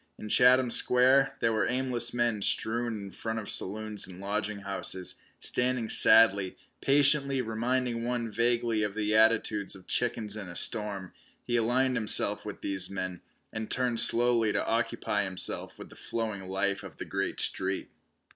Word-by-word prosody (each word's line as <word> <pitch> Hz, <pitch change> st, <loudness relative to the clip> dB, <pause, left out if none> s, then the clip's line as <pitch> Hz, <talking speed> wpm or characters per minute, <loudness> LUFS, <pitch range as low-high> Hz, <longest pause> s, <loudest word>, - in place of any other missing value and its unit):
In 105 Hz, -, -8 dB
Chatham 125 Hz, +1 st, +5 dB
Square 135 Hz, +3 st, +3 dB
there 115 Hz, -, +2 dB
were 110 Hz, -, +1 dB
aimless 125 Hz, -2 st, 0 dB
men 120 Hz, -3 st, 0 dB
strewn 115 Hz, +3 st, 0 dB
in 100 Hz, -1 st, -8 dB
front 110 Hz, +3 st, -4 dB
of 110 Hz, -2 st, -5 dB
saloons 105 Hz, 0 st, -2 dB
and 90 Hz, -1 st, -10 dB
lodging 105 Hz, +1 st, -3 dB
houses, 95 Hz, -2 st, -3 dB, 0.2 s
standing 125 Hz, -2 st, 0 dB
sadly, 100 Hz, -4 st, +4 dB, 0.2 s
patiently, 140 Hz, -1 st, +3 dB
reminding 120 Hz, +1 st, -1 dB
one 120 Hz, -2 st, -2 dB
vaguely 115 Hz, 0 st, +1 dB
of 105 Hz, -1 st, -2 dB
the 105 Hz, 0 st, -1 dB
attitudes 110 Hz, -2 st, +2 dB
of 95 Hz, -1 st, -14 dB
chickens 115 Hz, -3 st, -1 dB
in 100 Hz, -4 st, -7 dB
a 85 Hz, -, -9 dB
storm. 100 Hz, -2 st, -3 dB, 0.3 s
He 120 Hz, -, -2 dB
aligned 125 Hz, +2 st, +1 dB
himself 105 Hz, -2 st, 0 dB
with 105 Hz, -, -7 dB
these 95 Hz, -2 st, -3 dB
men, 95 Hz, -2 st, -5 dB, 0.3 s
and 110 Hz, 0 st, -5 dB
turned 125 Hz, -2 st, +1 dB
slowly 115 Hz, -2 st, +4 dB
to -, -, -1 dB
occupy 110 Hz, -2 st, -1 dB
himself 95 Hz, -1 st, -1 dB
with -, -, -11 dB
the -, -, -15 dB
flowing 110 Hz, -5 st, -4 dB
life 100 Hz, +1 st, -1 dB
of -, -, -11 dB
the -, -, -6 dB
great -, -, -3 dB
street. 95 Hz, 0 st, -1 dB
110 Hz, 160 wpm, -29 LUFS, 100-120 Hz, 0.3 s, Chatham